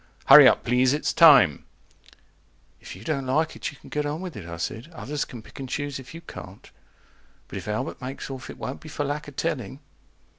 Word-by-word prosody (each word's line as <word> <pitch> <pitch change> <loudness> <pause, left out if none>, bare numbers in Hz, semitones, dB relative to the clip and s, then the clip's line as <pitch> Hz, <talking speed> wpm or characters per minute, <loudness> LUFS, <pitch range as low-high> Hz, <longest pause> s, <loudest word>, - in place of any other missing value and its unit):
HURRY 135 -1 +11
UP - - +3
PLEASE 125 +2 +3
IT'S 150 - -1
TIME 140 - +7 1.2
If - - -10
you 95 - -12
don't 140 -1 -2
like 155 +5 0
it - - -4
you 145 - -13
can - - -16
get 150 - -1
on 145 +2 -3
with 180 -3 -7
it, 90 -5 -8
I 85 - -6
said. 110 - -5
Others 150 -2 -3
can 120 -3 -10
pick - - -14
and 135 -1 -6
choose 145 0 -3
if 130 +4 -11
you 165 - -8
can't. 100 - -11 0.8
But - - -6
if - - -11
Albert 105 +1 -3
makes 130 +2 -6
off, 130 -1 -8
it - - -9
won't 130 - -6
be 155 - -11
for 145 - -3
lack 145 +1 -4
of 145 - -11
telling. 135 -6 -3
135 Hz, 220 wpm, -25 LUFS, 125-150 Hz, 1.2 s, HURRY